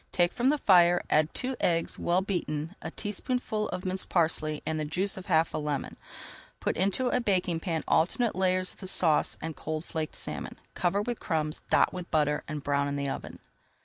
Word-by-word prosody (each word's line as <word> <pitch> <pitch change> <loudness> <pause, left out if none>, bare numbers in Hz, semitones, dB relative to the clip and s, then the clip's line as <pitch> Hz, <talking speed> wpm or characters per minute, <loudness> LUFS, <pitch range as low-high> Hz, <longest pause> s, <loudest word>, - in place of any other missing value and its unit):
Take 175 -1 +2
from 245 +2 +2
the 300 - +3
fire, 175 -7 +5
add 155 +1 +3
two 260 +1 -1
eggs, 165 -1 0
well 180 +2 +1
beaten, 165 -4 -3
a - - -5
teaspoonful 215 +1 -2
of 185 - -5
minced 185 0 -3
parsley 155 -3 0
and 160 -1 -1
the - - -1
juice 180 +6 -1
of 190 - -9
half 165 -3 +2
a - - -1
lemon. 150 -2 -3 0.6
Put - - -1
into 200 +8 +1
a 250 - +1
baking 185 -6 +1
pan 165 -2 -2
alternate 215 +8 +2
layers 185 0 +1
of - - -24
the 190 - -6
sauce 165 -4 +4
and 160 -1 -4
cold 155 +4 -4
flaked 160 -2 -4
salmon, - - -5 0.2
cover 190 +3 +1
with 240 +1 -3
crumbs, 155 -2 -2
dot - - +4
with 180 -1 -6
butter, 150 -1 +1
and 150 -2 -5
brown 140 0 +1
in 140 - -2
the 140 -1 -2
oven. - - -6
175 Hz, 200 wpm, -29 LUFS, 155-190 Hz, 0.6 s, fire